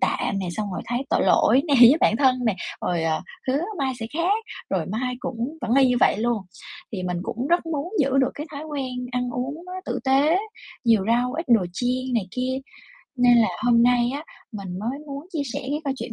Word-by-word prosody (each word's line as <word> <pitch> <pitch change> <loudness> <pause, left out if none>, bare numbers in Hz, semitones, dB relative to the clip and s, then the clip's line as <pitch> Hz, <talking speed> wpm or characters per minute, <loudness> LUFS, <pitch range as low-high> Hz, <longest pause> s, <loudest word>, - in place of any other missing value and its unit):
tạm 200 - 0
nè, 190 - -3
xong 210 -2 -3
rồi - - -4
thấy 245 +3 -2
tội - - +2
lỗi 255 +5 +4
nè, 285 - +3
với 245 +3 +10
bản 220 - +4
thân 260 -1 +4
nè, 220 - +2 0.3
rồi, 175 -2 0
ờ, 160 -1 0 0.3
hứa 275 +4 +1 0.2
mai 265 -1 0
sẽ 225 - -3
khác, 375 +8 0 0.3
rồi 180 -5 0
mai 250 +5 -2
cũng 250 +6 -4
vẫn 240 +1 0
y 270 -2 +5
như 250 - +2
vậy - - +4
luôn. 230 -2 0 0.5
Thì 190 - -3
mình 180 -1 -2
cũng 240 +7 -3
rất 345 0 +2
muốn 325 +4 -3
giữ 270 -1 +2
được 265 - +3
cái 300 - -6
thói 290 +1 -6
quen 260 -5 -4
ăn 250 0 -1
uống 270 +7 -4
nó 365 - -8
tử - - -2
tế, 280 +6 +4 0.5
nhiều 225 -5 +4
rau, 245 +2 +2
ít 330 +3 -3
đồ 225 -7 +4
chiên 255 +4 -1
này 220 -5 0
kia, 255 +2 -2 0.6
nên 245 -1 +5
là 220 - +4 0.2
hôm 235 -1 +5
nay 245 0 +3
á, 295 +3 -5 0.3
mình 190 -3 -6
mới 235 +7 -3
muốn 280 +2 -7
chia 310 -4 -1
sẻ - - -3
cái 290 +3 -2
câu 275 -2 -1
chuyện 235 - -6
250 Hz, 225 wpm, -24 LUFS, 230-280 Hz, 0.6 s, với